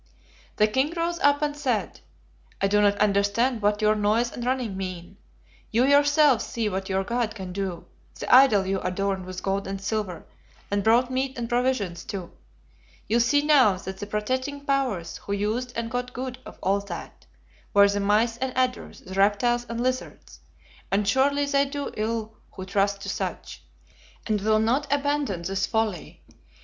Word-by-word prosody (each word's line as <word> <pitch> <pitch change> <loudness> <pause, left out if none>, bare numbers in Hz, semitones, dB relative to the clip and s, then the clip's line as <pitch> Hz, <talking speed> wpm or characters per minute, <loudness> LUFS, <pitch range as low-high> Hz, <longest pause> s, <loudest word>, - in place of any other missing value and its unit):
"The 215 - +4
king 265 +8 0
rose 340 0 -1
up 285 +1 +3
and 295 -1 -1
said, 260 -7 -2 0.6
'I 195 - +2
do 210 +1 +3
not 205 0 +3
understand 210 +4 +1
what 210 +1 +1
your 215 0 +5
noise 215 +3 +1
and 240 - -6
running 250 -5 -1
mean. 185 0 -6 0.5
You 235 +3 +3
yourselves 285 -2 +4
see 230 -2 -2
what 190 0 -4
your 190 0 0
God 235 +1 -2
can 190 -3 -7
do, 185 -3 -4 0.3
the - - -5
idol 250 -7 +7
you 190 0 -1
adorned 190 0 -2
with 185 0 -7
gold 195 0 -1
and 195 0 -4
silver, 195 -3 -3 0.5
and 200 0 0
brought 240 +4 +3
meat 260 +1 -2
and 235 -1 -3
provisions 240 -8 -1
to. 185 -4 -6 0.8
You 230 +4 +2
see 290 +5 +3
now 265 -10 +5
that 190 +1 -8
the 205 - -5
protecting 260 +7 -3
powers, 260 -12 -1
who 200 - -5
used 220 +5 -1
and 230 -1 -3
got 250 0 -3
good 255 0 -5
of - - -11
all 195 +2 +2
that, 200 0 -9 0.4
were 200 0 +6
the 200 0 0
mice 215 +3 +2
and 260 +1 -3
adders, 255 -1 -1
the 185 - -10
reptiles 210 +5 +2
and 230 0 -4
lizards; 255 0 -4 0.5
and 200 +1 +1
surely 280 +6 +2
they 280 -1 +2
do 285 0 -4
ill 220 0 -2 0.2
who 185 - -7
trust 200 +1 0
to - - -6
such, - - -5 0.6
and 215 -2 0
will 215 +1 +3
not 250 +7 +1
abandon 285 -10 0
this 195 +2 -1
folly. 220 -7 -2
220 Hz, 175 wpm, -25 LUFS, 200-255 Hz, 0.8 s, idol